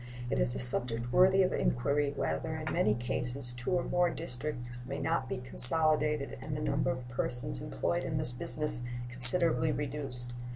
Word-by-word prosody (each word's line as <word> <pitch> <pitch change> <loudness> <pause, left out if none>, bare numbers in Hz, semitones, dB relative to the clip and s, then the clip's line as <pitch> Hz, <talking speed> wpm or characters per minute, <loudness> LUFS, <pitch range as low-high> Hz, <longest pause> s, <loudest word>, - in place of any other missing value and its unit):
It - - -3
is 120 - +1
a - - -6
subject 120 -1 -1
worthy 190 +1 +2
of 185 - -3
inquiry 140 +4 -3
whether 160 +3 -6
in 155 -1 -7
many 105 0 -2
cases 120 +1 -5
two 125 +9 +2
or 175 - -2
more 175 0 -2
districts 120 -4 -6
may 140 - -8
not 145 -2 -5
be - - -6
consolidated 150 +2 +2
and 145 +2 -8
the - - -7
number 145 -3 -4
of 130 -1 -7
persons 120 - +3
employed - - -6
in - - -6
this 125 - +1
business 125 +1 -1 0.3
considerably 155 +6 +7
reduced. 135 -4 -9
130 Hz, 170 wpm, -27 LUFS, 120-150 Hz, 0.3 s, considerably